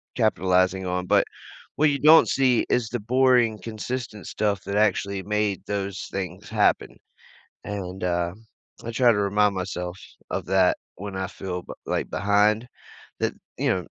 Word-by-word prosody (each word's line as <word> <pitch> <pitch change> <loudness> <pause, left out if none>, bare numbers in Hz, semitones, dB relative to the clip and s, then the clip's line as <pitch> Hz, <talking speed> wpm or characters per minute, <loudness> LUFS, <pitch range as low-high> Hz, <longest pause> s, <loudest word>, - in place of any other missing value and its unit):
capitalizing 95 -4 +2
on, 90 0 -2
but - - +4 0.5
what 155 0 +4
you 140 -1 -1
don't 155 +3 +7
see 130 -3 +3
is 120 -2 +1
the 120 - -3
boring, 120 -1 +3
consistent 115 -1 -5
stuff 100 -2 -1
that 100 +1 -2
actually 100 -2 +1
made 105 -1 -1
those 100 -1 -3
things 95 +1 -5
happen, 105 -2 +1 0.7
and, 95 -2 -5
uh, 85 -1 0 0.5
I - - -4
try 120 +1 +4
to 105 - +1
remind 105 0 +2
myself 90 -1 -4 0.4
of - - -2
that 95 -1 +3 0.2
when 100 0 -7
I 95 0 -2
feel, 90 -2 -5
b - - -8
like, - - -2
behind 105 +3 +2 0.5
that, - - 0 0.2
you - - 0
know, - - 0
100 Hz, 155 wpm, -25 LUFS, 95-110 Hz, 0.7 s, don't